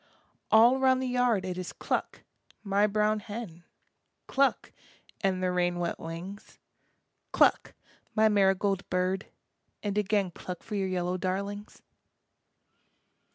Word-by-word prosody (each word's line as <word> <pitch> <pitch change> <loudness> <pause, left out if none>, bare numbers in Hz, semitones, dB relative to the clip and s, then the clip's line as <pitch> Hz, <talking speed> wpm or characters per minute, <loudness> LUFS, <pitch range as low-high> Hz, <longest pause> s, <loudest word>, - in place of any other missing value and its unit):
All 235 +4 +6
round 260 -1 +4
the 260 - -2
yard 245 -6 +1
it 185 -1 -4
is 180 - -5
cluck, - - -3 0.4
my 200 0 +2
brown 210 +1 +1
hen, 205 -5 -8 0.6
Cluck, 275 0 +1 0.5
and 185 -1 +1
the 180 - +1
rain 175 -1 0
wet 175 -1 -2
wings, 170 +5 -8 0.7
Cluck, - - +3 0.4
my 220 0 +5
marigold 195 -1 +2
bird, 185 +2 -1 0.6
and 205 0 0
again 200 -2 +1
Cluck 180 +1 -8
for 215 - -9
your 195 -2 0
yellow 180 0 -1
darlings. 200 +3 -4
195 Hz, 120 wpm, -29 LUFS, 185-215 Hz, 0.7 s, All